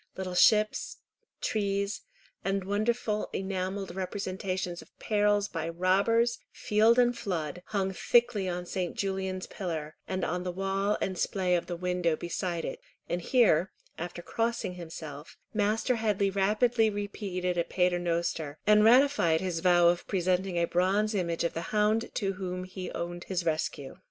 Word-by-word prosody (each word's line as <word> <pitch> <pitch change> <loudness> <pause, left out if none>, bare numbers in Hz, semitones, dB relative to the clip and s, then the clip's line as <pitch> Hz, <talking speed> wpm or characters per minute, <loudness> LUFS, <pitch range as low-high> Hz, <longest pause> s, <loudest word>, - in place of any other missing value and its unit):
Little 185 -1 -4
ships, 215 +3 +3 0.4
trees, 200 -1 -1 0.4
and 195 0 0
wonderful 210 +2 -1
enamelled 190 0 -3
representations 185 -1 -3
of - - -19
perils 205 -1 +2
by 165 -3 -4
robbers, 200 +7 +2
field 220 +3 +3
and 245 -1 +4
flood, 175 -6 -3
hung 195 -2 -1
thickly 220 -2 +2
on 180 0 -3
St. 180 0 -3
Julian's 190 -1 -2
pillar, 160 -5 -5
and 185 -1 -1
on 180 +2 -2
the 180 0 -3
wall 195 +2 0
and 185 -2 -2
splay 185 -2 0
of 175 -1 +1
the 175 - -3
window 180 -2 0
beside 170 0 -3
it; - - -5 0.3
and 175 - -2
here, 190 -6 +3 0.3
after 175 +1 -6
crossing 230 -3 -1
himself, 160 -4 -9 0.2
Master 220 +3 +1
Headley 205 -3 +1
rapidly 215 +4 +2
repeated 200 -3 -3
a 170 - +1
Paternoster, 170 -4 0
and 210 0 +6
ratified 240 - +5
his 180 -2 -2
vow 175 0 +5
of 175 0 -1
presenting 185 -1 0
a 170 - +3
bronze 195 +5 +1
image 170 -4 -1
of 170 - 0
the 165 - -3
hound 215 +2 +2
to 195 -3 0
whom 185 -1 -4
he 185 0 -6
owed 175 0 -5
his 180 -2 -2
rescue. 155 -4 -2
190 Hz, 150 wpm, -29 LUFS, 175-210 Hz, 0.4 s, and